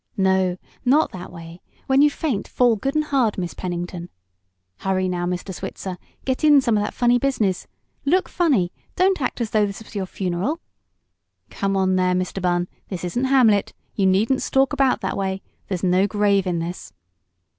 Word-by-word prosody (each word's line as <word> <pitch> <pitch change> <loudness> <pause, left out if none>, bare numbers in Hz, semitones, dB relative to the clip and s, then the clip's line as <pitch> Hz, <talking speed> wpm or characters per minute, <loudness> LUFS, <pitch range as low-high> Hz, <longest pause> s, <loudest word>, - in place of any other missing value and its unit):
"No, 190 -2 +2 0.3
not 280 +5 +3
that 180 -1 -8
way! 170 0 -11 0.2
When 270 +1 +4
you 295 - +6
faint, 285 -7 -2
fall 245 -2 +3
good 270 +7 -3
and 305 - +3
hard, 265 -8 +1
Miss 175 -2 -3
Pennington!" 175 -1 -5 0.7
"Hurry 185 - 0
now, 175 -1 -2
Mr. 180 +2 -3
Switzer; 180 +1 -6 0.3
get 260 +3 -1
in 295 -2 +7
some 235 -4 +1
of 205 - +2
that - - -4
funny 245 0 +3
business! 220 -9 0 0.4
Look 355 +6 +2
funny; 265 - +1 0.2
don't 370 -2 +2
act 250 - -2
as 225 - -2
though 210 -1 +3
this 200 +2 -7
was - - -16
your 195 -3 -3
funeral!" 190 - -2 0.9
"Come 195 0 -1
on 185 -1 +2
there 180 0 +2
Mr. 185 +1 -2
Bunn; 175 -1 +1 0.2
this 185 -3 -5
isn't 240 +9 -1
'Hamlet.' 245 -7 +3 0.2
You 195 -2 +2
needn't 215 +8 +2
stalk 270 0 +2
about 265 -3 +2
that 190 - -2
way. 190 -1 -2 0.2
There's 185 -2 -3
no 185 +2 +3
grave 200 -2 +2
in 175 -1 0
this!" 170 +2 -5
195 Hz, 180 wpm, -22 LUFS, 185-260 Hz, 0.9 s, in